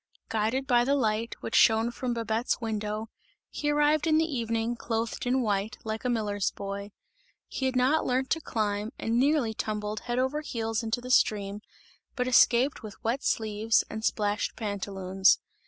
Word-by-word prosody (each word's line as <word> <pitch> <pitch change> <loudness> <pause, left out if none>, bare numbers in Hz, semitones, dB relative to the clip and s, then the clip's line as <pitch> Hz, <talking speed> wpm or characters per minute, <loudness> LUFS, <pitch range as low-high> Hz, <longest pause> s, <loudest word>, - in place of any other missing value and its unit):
Guided 225 +5 0
by 240 -2 +4
the 275 +3 +2
light, 225 -3 0
which - - -6
shone 225 +1 +5
from 240 0 -3
Babette's 230 +1 -1
window, 215 -1 -3 0.4
he 295 - -2
arrived 295 +1 +3
in 310 -1 +4
the 320 - +3
evening, 230 -5 -1
clothed 230 +1 -3
in 255 +1 +2
white, 205 -1 -1
like 220 0 -4
a 250 - 0
miller's 210 -4 0
boy; 200 +1 -6 0.6
he 265 - -2
had 260 - -2
not 260 +5 +3
learnt 260 +1 0
to 325 - +1
climb 210 -3 -2
and 230 +1 0
nearly 275 -4 +2
tumbled 210 -1 -3
head 240 0 -3
over 265 +4 0
heels 225 -5 -2
into 230 +2 -2
the 250 +1 -5
stream, 205 -4 +2 0.5
but 250 -1 -1
escaped 255 +2 +4
with 215 -3 -8
wet 235 +5 0
sleeves 220 0 +1
and 220 0 -5
splashed 210 -1 0
pantaloons. 195 -3 +1
225 Hz, 170 wpm, -28 LUFS, 215-255 Hz, 0.6 s, shone